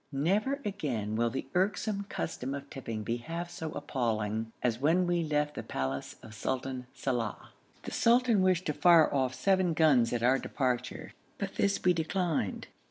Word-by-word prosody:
Never 200 - +1
again 130 - -2
will 115 +1 +2
the 130 - -4
irksome 200 +2 0
custom 135 -4 -3
of 140 0 -7
tipping 115 -5 -5
be 115 +3 -1
half 170 +7 -5
so 160 -2 -5
appalling 115 -6 -2
as 120 -2 +1
when 165 +6 +3
we 175 -1 +1
left 150 -1 0
the - - -5
palace 65 +1 -3
of 110 - -11
Sultan 130 +3 -3
Salàh. 120 -6 -3 0.3
The - - -6
sultan 235 -3 +4
wished 185 -1 +2
to 150 - 0
fire 165 -1 +5
off 130 -2 +1
seven 185 0 +2
guns 140 -8 +4
at 120 -1 -1
our 130 +2 +4
departure, 125 -2 -2 0.2
but 195 -1 -4
this 200 0 0
we 180 - +5
declined. 165 - -1
145 Hz, 165 wpm, -30 LUFS, 120-180 Hz, 0.3 s, fire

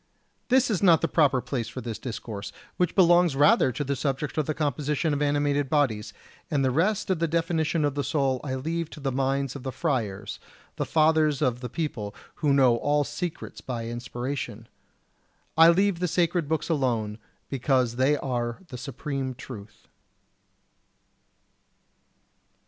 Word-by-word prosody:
This 255 -1 +4
is 195 - 0
not 175 -5 +5
the 165 - +1
proper 140 -7 +3
place 120 -4 -3
for 120 - -7
this 115 -3 -5
discourse, 110 -4 -6 0.3
which 180 -2 +1
belongs 175 -4 +5
rather 140 -2 +5
to 125 +4 -3
the 140 0 -1
subject 140 +1 -2
of 150 - -1
the 155 - -1
composition 150 +1 0
of 145 - -1
animated 145 -1 +1
bodies; 115 -8 +1 0.4
and 145 -4 +1
the 130 - +2
rest 190 +8 +1
of 180 - 0
the 165 - +1
definition 165 -1 0
of 145 - 0
the 145 0 -2
soul 135 -2 0
I 130 -2 -3
leave 160 +4 -3
to 155 - -11
the 135 -2 -2
minds 135 +1 -1
of 140 - -6
the 130 - -4
friars, 110 - -2 0.4
the - - -2
fathers 155 -2 +3
of 125 -5 +1
the 125 -1 -6
people, 115 -9 -4 0.2
who 150 - +1
know 130 -4 +5
all 145 +3 +1
secrets 150 +4 -5
by 120 -3 -4
inspiration. 120 -1 -5 0.9
I 165 +1 +8
leave 190 +1 +3
the 180 - 0
sacred 170 -2 +1
books 160 -1 -1
alone, 115 -9 -1 0.3
because 130 -3 +1
they 135 +3 +3
are 120 -3 -2
the 125 - -7
supreme 135 0 -4
truth. 105 -5 -11
140 Hz, 160 wpm, -26 LUFS, 125-160 Hz, 0.9 s, I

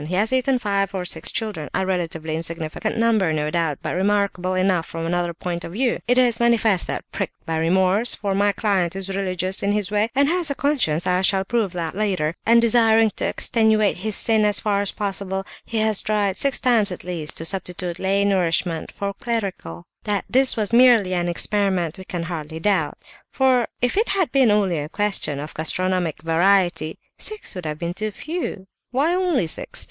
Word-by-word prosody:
He 180 - -2
has 215 +6 +1
eaten 260 0 +2
five 200 -3 -1
or 180 -1 -3
six 165 -2 -2
children, 210 -10 -3
a 190 - 0
relatively 165 -4 -2
insignificant 165 +6 -3
number, 220 -7 +2
no 150 -1 -1
doubt, 165 -4 0
but - - -2
remarkable 190 -1 0
enough 185 -3 +1
from 165 0 -5
another 175 0 -1
point 170 0 -5
of 170 - -7
view. 245 +3 0
It 245 +1 +3
is 245 -3 +3
manifest 225 -5 +2
that, - - -4
pricked - - -5
by 165 0 -2
remorse—for 190 +5 +1
my 205 +1 +2
client 190 -5 0
is 195 0 -4
religious, 185 -1 -2
in 200 +1 +1
his 210 -2 -1
way, 210 +2 +1
and 280 +1 +4
has 345 0 0
a 280 - -2
conscience, 255 - 0
as 180 0 +2
I - - 0
shall 190 0 +3
prove 210 -4 -1
later—and 180 +4 +1
desiring 225 -1 +4
to - - 0
extenuate 220 -2 +2
his 210 +3 -2
sin 220 -2 +2
as 210 -1 +2
far 205 -2 0
as 200 - -1
possible, 195 -1 -3 0.2
he 230 - -4
has 215 -2 +2
tried 205 -2 0
six 275 +4 +1
times 230 -6 +2
at 180 - -7
least 170 -4 -4
to 165 - -3
substitute 180 -1 -2
lay 195 +1 +1
nourishment 175 -4 0
for 200 0 -4
clerical. 195 - -4 0.2
That 205 -2 -1
this 260 0 +3
was 215 0 -1
merely 235 -6 +5
an 175 -1 0
experiment 190 -2 0
we 190 - -9
can 175 -2 -4
hardly 160 -2 -5
doubt: 180 -5 0 0.3
for 260 -3 +2 0.2
if 245 - +2
it 445 - +2
had 380 -4 +2
been 265 -4 +4
only 200 -6 +2
a 145 +1 -5
question 200 -8 -1
of 150 +2 -7
gastronomic 175 -1 -1
variety, 175 -1 +2 0.2
six 430 -1 -4
would 180 -5 -6
have 150 0 -4
been 170 +1 -3
too 215 +3 -3
few; 305 - -5 0.2
why 285 +7 +1
only 360 - +1
six? 160 - -2
195 Hz, 195 wpm, -22 LUFS, 175-220 Hz, 0.3 s, merely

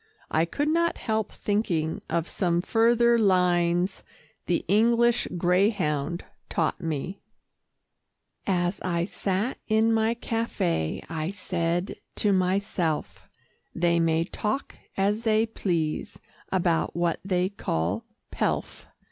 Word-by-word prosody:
I 160 +1 +3
could 290 - -2
not 335 +2 +2
help 220 -2 -1
thinking 180 -7 -1
of 170 0 0
some 175 -2 0
further 235 +2 +4
lines 180 -2 +2 0.5
the 175 - 0
English 235 +4 +3
greyhound 175 -4 +1 0.2
taught 165 +2 0
me 165 +3 -3 1.3
"As 180 0 0
I 170 -2 0
sat 200 +5 -2
in 220 +1 +3
my 225 +1 +2
café, 155 - -1
I 160 0 -3
said 180 -2 -1 0.2
to 205 -2 +2
myself, 185 -4 -1 0.5
They 170 0 +2
may 165 0 +2
talk 210 +8 -3 0.2
as 205 +3 +1
they 220 -1 +3
please 170 -8 -2 0.3
about 170 -3 +1
what 170 -1 0
they 185 -1 +1
call 95 - -2 0.3
pelf. - - -2
185 Hz, 110 wpm, -26 LUFS, 170-220 Hz, 1.3 s, further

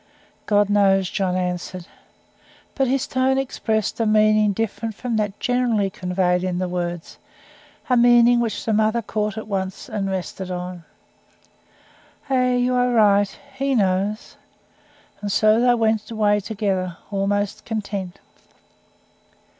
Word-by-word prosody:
"God 205 -1 +3
knows," 195 -2 +2
John 185 -2 -1
answered. 180 0 -3 0.9
But 270 -2 0
his 265 +1 0
tone 260 +1 +1
expressed 220 -6 -2
a 225 - +1
meaning 215 -1 +4
different 225 +1 -3
from 235 +2 -3
that 210 -2 -2
generally 240 -6 +1
conveyed 180 -1 0
in 185 -1 -2
the 185 0 -1
words: 175 -1 -5 0.7
a 250 - +3
meaning 240 0 +5
which 230 -3 -2
the 220 - 0
mother 220 +2 +1
caught 210 0 -2
at 220 - -6
once, 190 0 -4
and 210 -5 -3
rested 190 0 -4
on. 180 -1 -6 1.5
"Ay 255 -1 +2
you 245 +1 +1
are 250 0 +2
right. 205 -4 +4 0.2
He 270 0 -1
knows!" 200 0 -1 0.8
And 205 -1 -3
so 215 +3 +4
they 245 0 +4
went 220 -2 0
away 210 -2 +2
together, 195 -4 -2
almost 205 0 -1
content. 200 -4 -4
210 Hz, 130 wpm, -22 LUFS, 190-230 Hz, 1.5 s, meaning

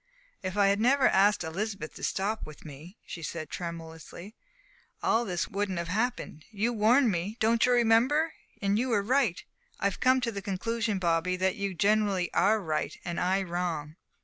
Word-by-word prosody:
"If 185 0 -4
I 200 -1 +5
had 200 +1 +1
never 260 +4 +4
asked 200 0 +3
Elizabeth 185 0 -4
to - - -11
stop 210 +3 -1
with 155 0 -12
me," 155 - -11
she 170 - -8
said 155 -1 -6
tremulously, 170 +3 -7 0.7
"all 235 +1 +2
this 180 -4 -2
wouldn't 200 -2 -2
have 170 -1 -3
happened. 220 -6 -2
You 220 +3 -1
warned 230 +3 +4
me 190 +5 -3
don't 225 +1 +3
you - - +3
remember? 245 +7 +3 0.3
and 200 +2 +2
you 255 +2 0
were 210 -4 +2
right. 240 -5 +1 0.4
I've 200 -1 -1
come 260 0 +4
to 235 -2 -1
the 200 -2 -5
conclusion, 210 +2 -2
Bobby, 170 0 +1
that 185 +2 0
you 200 -3 -3
generally 200 -2 +1
are 215 +2 +3
right 160 -6 -3
and 175 -1 -3
I 190 +2 +1
wrong." 170 -4 -3
200 Hz, 175 wpm, -28 LUFS, 175-225 Hz, 0.7 s, I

